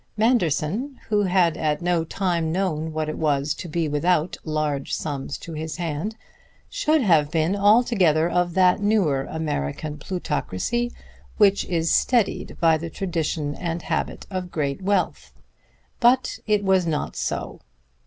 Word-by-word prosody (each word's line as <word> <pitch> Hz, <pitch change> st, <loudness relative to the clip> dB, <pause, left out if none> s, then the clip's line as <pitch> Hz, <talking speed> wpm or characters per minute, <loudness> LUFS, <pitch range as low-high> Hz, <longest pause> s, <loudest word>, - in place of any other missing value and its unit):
Manderson, 220 Hz, -, +1 dB
who 210 Hz, -1 st, +3 dB
had 180 Hz, -3 st, +3 dB
at 150 Hz, -1 st, 0 dB
no 175 Hz, -2 st, +1 dB
time 170 Hz, -2 st, -1 dB
known 160 Hz, -3 st, -1 dB
what 155 Hz, 0 st, -2 dB
it 155 Hz, -, -4 dB
was 145 Hz, -1 st, +1 dB
to 175 Hz, -, -8 dB
be 165 Hz, 0 st, -1 dB
without 160 Hz, +3 st, +1 dB
large 155 Hz, -3 st, -1 dB
sums 145 Hz, -1 st, -4 dB
to 165 Hz, -, -9 dB
his 155 Hz, -1 st, -5 dB
hand, 170 Hz, +5 st, -3 dB, 0.6 s
should 315 Hz, -, +2 dB
have 160 Hz, -7 st, +4 dB
been 160 Hz, +4 st, +1 dB
altogether 200 Hz, -6 st, +4 dB
of 175 Hz, 0 st, 0 dB
that 185 Hz, +1 st, +4 dB
newer 185 Hz, -11 st, +2 dB
American 150 Hz, -, -3 dB
plutocracy 185 Hz, -, -2 dB, 0.5 s
which 200 Hz, -2 st, +4 dB
is 165 Hz, -2 st, 0 dB
steadied 240 Hz, -5 st, +1 dB
by 165 Hz, -2 st, +4 dB
the 165 Hz, +1 st, -5 dB
tradition 160 Hz, -4 st, -2 dB
and 170 Hz, +1 st, -4 dB
habit -, -, -3 dB
of 185 Hz, -1 st, -3 dB
great 145 Hz, -1 st, -2 dB
wealth. 195 Hz, 0 st, -1 dB, 0.7 s
But 255 Hz, +2 st, +3 dB
it 210 Hz, -1 st, +2 dB
was 190 Hz, -2 st, +3 dB
not 155 Hz, -2 st, -2 dB
so. -, -, -3 dB
170 Hz, 145 wpm, -23 LUFS, 155-195 Hz, 0.7 s, have